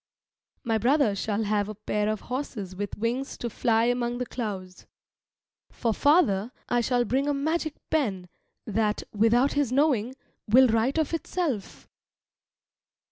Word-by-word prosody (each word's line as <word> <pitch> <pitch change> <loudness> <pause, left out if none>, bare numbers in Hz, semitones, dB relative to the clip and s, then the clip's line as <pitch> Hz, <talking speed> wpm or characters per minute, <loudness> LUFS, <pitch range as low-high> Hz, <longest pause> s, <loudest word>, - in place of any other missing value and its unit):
My 225 -1 0
brother 250 -3 +3
shall 205 +2 -1
have 205 -1 0
a 215 - -6
pair 210 0 -1
of 215 -1 -2
horses 240 -8 -5
with 205 +1 -5
wings 240 +5 -2
to 235 - -4
fly 225 +1 +2
among 245 0 0
the 250 - -2
clouds. 190 -7 -6 0.8
For 230 -3 -1
father 240 - +3 0.2
I 240 - +2
shall 245 +1 +1
bring 270 +4 0
a 290 - +1
magic 315 +2 -1 0.2
pen 205 - 0 0.4
that, 215 0 0
without 230 +6 +3
his 285 -4 0
knowing, 260 -4 +2 0.3
will 255 +5 +6
write 230 +6 +1
of 315 0 0
itself. 330 - -3
235 Hz, 140 wpm, -26 LUFS, 210-270 Hz, 0.8 s, will